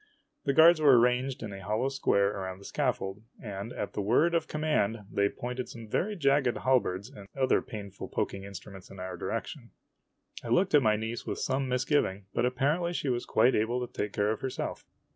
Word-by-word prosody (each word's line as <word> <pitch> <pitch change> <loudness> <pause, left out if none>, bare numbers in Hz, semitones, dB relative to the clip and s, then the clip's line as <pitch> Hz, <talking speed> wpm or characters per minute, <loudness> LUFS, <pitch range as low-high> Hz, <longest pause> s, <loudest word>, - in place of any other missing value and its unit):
The 140 - +2
guards 160 +2 +7
were 135 -5 +7
arranged 125 +1 +1
in 105 -3 -6
a 95 - -8
hollow 110 +6 0
square 100 -7 +2
around 95 -1 -5
the 100 - -15
scaffold, 125 -8 -2 0.2
and 100 +1 -6
at - - -5
the - - -2
word 125 +12 +3
of 165 -2 +1
command 150 -9 0
they 100 0 +2
pointed 125 +3 -5
some 115 -1 -9
very 205 - -1
jagged 140 -6 +2
halberds 115 -7 +1
and 100 -8 -12
other 130 - +3
painful 100 -4 -8
poking 100 0 -3
instruments 100 -1 -10
in 95 - -11
our 90 0 -5
direc - - -3
tion. - - -10 0.7
I - - -7
looked 180 +12 +2
at 150 - +7
my 110 -4 +3
niece 110 +2 -4
with - - -2
some 135 0 -1
misgiving, 125 -6 0
but 120 - +2
apparently 150 +7 0
she 145 - -2
was 120 -1 -1
quite 125 - +4
able 115 +4 +1
to - - -18
take 105 - -2
care 105 +1 +1
of 110 - -4
herself. 130 - -4
120 Hz, 200 wpm, -29 LUFS, 100-135 Hz, 0.7 s, guards